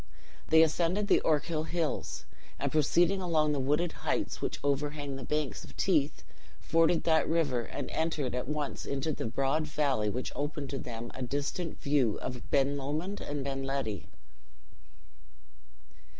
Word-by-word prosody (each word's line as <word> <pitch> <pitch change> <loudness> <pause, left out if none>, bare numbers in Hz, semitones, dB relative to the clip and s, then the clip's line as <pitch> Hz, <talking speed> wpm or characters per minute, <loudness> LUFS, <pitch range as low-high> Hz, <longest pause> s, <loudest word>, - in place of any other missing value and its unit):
They 160 0 +8
ascended 175 +5 +1
the - - +5
Ochil 155 +1 +1
Hills, 165 -3 -2 0.3
and - - -1
proceeding 175 +5 +3
along 155 -4 +2
the 145 - 0
wooded 150 +6 +1
heights - - -1
which - - -2
overhang 145 0 -1
the 135 - -6
banks 150 -2 -2
of - - -14
Teith, 155 -6 +2 0.4
forded 165 0 +3
that 160 -1 +3
river, 150 -7 +2
and - - -5
entered 155 -5 -1
at 125 0 -2
once 150 -1 -2
into 140 +3 -1
the 115 - -3
broad 135 +6 0
valley 140 -9 +1
which 125 +4 -3
opened 145 -1 -3
to 135 - -2
them 120 -1 -6
a 130 - -7
distant 145 +6 -2
view 140 -7 +2
of 125 -1 -6
Ben 140 +1 +3
Lomond 155 +9 -3
and 145 -1 -3
Ben 135 0 -3
Ledi. 135 -8 -2
145 Hz, 150 wpm, -31 LUFS, 135-160 Hz, 0.4 s, They